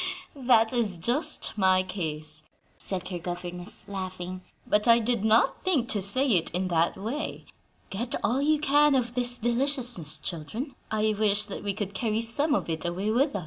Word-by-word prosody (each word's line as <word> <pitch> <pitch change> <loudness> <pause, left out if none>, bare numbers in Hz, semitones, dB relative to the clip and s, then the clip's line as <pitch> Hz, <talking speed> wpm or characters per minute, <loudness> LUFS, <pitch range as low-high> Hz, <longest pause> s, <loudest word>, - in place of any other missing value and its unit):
"That 245 -4 +3
is 220 -7 +1
just 240 - 0
my 185 -1 +4
case," 155 -5 -5 0.3
said 185 -2 -5
her 180 -2 -4
governess, 175 +1 -7
laughing, 185 -2 -6 0.2
"but 210 +2 +1
I 230 0 +7
did 235 -2 0
not 220 +4 +3
think 300 -11 0
to 205 - +1
say 255 +9 +1
it 180 -10 +2
in 185 +1 -1
that 165 -1 +1
way. 230 +10 -5 0.5
Get 235 +5 -3
all 255 +5 +1
you 305 +2 +3
can 295 0 +4
of 240 -2 0
this 245 0 +1
deliciousness, 240 - +2
children; 215 - -5 0.2
I 215 0 +1
wish 205 -1 +2
that 200 - -7
we 200 -1 -2
could 205 -1 -4
carry 220 +2 -1
some 285 +6 +2
of - - -2
it 160 -1 -1
away 185 +5 -2
with 270 +5 +1
us." - - 0
215 Hz, 180 wpm, -27 LUFS, 185-245 Hz, 0.5 s, I